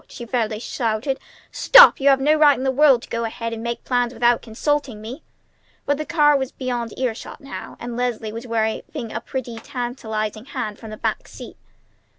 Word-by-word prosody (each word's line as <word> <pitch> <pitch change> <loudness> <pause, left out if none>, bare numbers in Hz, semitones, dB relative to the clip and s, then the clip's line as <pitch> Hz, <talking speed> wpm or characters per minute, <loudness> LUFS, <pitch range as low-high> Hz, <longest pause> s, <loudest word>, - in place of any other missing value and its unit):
she 240 - -8
fairly 225 -2 -1
shouted. 230 +3 -2 0.3
"Stop! - - +8
You 280 +1 +4
had 270 -1 +5
no 295 +3 +3
right 300 -2 +5
in 255 - -4
the 265 - +2
world 270 -3 +4
to - - -12
go 230 0 -2
ahead 230 0 -4
and 225 - -6
make 235 0 -4
plans 245 -1 0
without 240 0 +3
consulting 260 +1 -2
me!" 235 +8 -8 0.6
But 285 0 0
the 305 - -4
car 295 -3 +4
was 265 -2 -1
beyond 245 -3 -4
ear 255 -3 0
shot 220 - -10
now, 275 -2 -9
and 240 0 -6
Leslie 235 -3 -2
was 230 +2 -7
waving 225 0 -2
a 230 - -3
pretty, 240 -3 -5
tantalizing 225 -3 -4
hand 215 -6 -5
from 220 - -10
the 215 - -8
back - - -2
seat. - - -11
240 Hz, 195 wpm, -22 LUFS, 225-270 Hz, 0.6 s, Stop